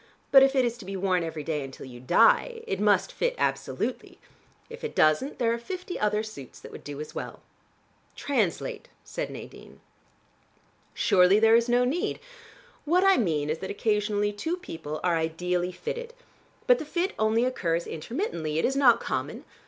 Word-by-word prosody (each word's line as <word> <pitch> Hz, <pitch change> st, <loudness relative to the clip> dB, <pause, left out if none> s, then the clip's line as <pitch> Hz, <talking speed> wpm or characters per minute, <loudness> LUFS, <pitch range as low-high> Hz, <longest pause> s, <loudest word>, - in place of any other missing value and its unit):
But 270 Hz, -, +9 dB
if 270 Hz, +1 st, +4 dB
it 260 Hz, -2 st, +4 dB
is 235 Hz, 0 st, -3 dB
to 205 Hz, -, -10 dB
be 195 Hz, +1 st, -5 dB
worn 185 Hz, -2 st, +1 dB
every 160 Hz, -2 st, -5 dB
day 150 Hz, -2 st, -2 dB
until 135 Hz, 0 st, -9 dB
you 125 Hz, -2 st, -11 dB
die, 455 Hz, -, +3 dB
it 190 Hz, -, -3 dB
must 200 Hz, -2 st, +2 dB
fit -, -, -1 dB
absolutely. -, -, -2 dB, 0.5 s
If 470 Hz, +1 st, -11 dB
it 460 Hz, -, -5 dB
doesn't, 155 Hz, -, +2 dB
there 230 Hz, -2 st, +1 dB
are 235 Hz, -, -3 dB
fifty 365 Hz, +8 st, -6 dB
other 210 Hz, 0 st, +1 dB
suits 140 Hz, -, -10 dB
that -, -, -12 dB
would -, -, -10 dB
do 145 Hz, -1 st, -7 dB
as 150 Hz, -, -7 dB
well." -, -, -6 dB, 0.8 s
"Translate," 265 Hz, -, -2 dB
said -, -, -5 dB
Nadine. -, -, -11 dB, 1.2 s
"Surely 190 Hz, -1 st, +4 dB
there 225 Hz, +1 st, +5 dB
is 235 Hz, +1 st, +2 dB
no 245 Hz, +1 st, +3 dB
need. 305 Hz, +8 st, -1 dB, 0.6 s
What 350 Hz, +5 st, +2 dB
I 390 Hz, 0 st, +5 dB
mean 155 Hz, -9 st, 0 dB
is 160 Hz, -, -3 dB
that 190 Hz, -, -6 dB
occasionally 210 Hz, -1 st, 0 dB
two 320 Hz, -, -3 dB
people 160 Hz, -, -7 dB
are 175 Hz, -2 st, +2 dB
ideally 175 Hz, +3 st, -1 dB
fitted. 480 Hz, -, -6 dB, 0.5 s
But -, -, +5 dB
the -, -, -5 dB
fit 350 Hz, +6 st, -1 dB
only 220 Hz, +2 st, +2 dB
occurs 170 Hz, -9 st, -1 dB
intermittently: 160 Hz, -, -3 dB
it 160 Hz, -, +2 dB
is 265 Hz, -, 0 dB
not 260 Hz, -4 st, +5 dB
common. -, -, -4 dB
210 Hz, 175 wpm, -27 LUFS, 165-275 Hz, 1.2 s, But